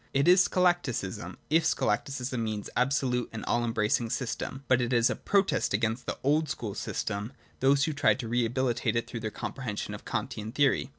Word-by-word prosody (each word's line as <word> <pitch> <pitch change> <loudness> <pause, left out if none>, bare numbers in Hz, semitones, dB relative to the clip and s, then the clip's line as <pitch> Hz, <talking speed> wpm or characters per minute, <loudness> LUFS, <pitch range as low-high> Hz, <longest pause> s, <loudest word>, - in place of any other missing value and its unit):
It 140 +3 +3
is 180 +1 +7
scholasticism, 145 - 0
if 165 +1 +4
scho 160 - +1
lasticism 125 +3 -1
means 110 -2 -3
an - - -18
absolute 125 -2 +1
and 110 - -6
all 120 - +1
embracing 115 0 +1
system; 130 +2 -3
but 130 -1 +4
it 120 +1 -1
is 120 0 +4
a - - -1
protest 195 - +1
against 110 +3 -1
the - - -2
old 150 +2 +2
school 110 -6 -4
system 100 0 -3
and 115 - -8 0.3
those 135 +1 +4
who 155 - 0
tried 145 - +3
to 115 - -5
rehabilitate 120 +1 0
it 115 - 0
through 120 - -6
their 110 -1 -3
compre 135 - -6
hensions 105 -5 -4
of - - -8
the - - -10
Kantian 110 +1 -3
theory. 140 -2 +2
125 Hz, 210 wpm, -29 LUFS, 110-140 Hz, 0.3 s, is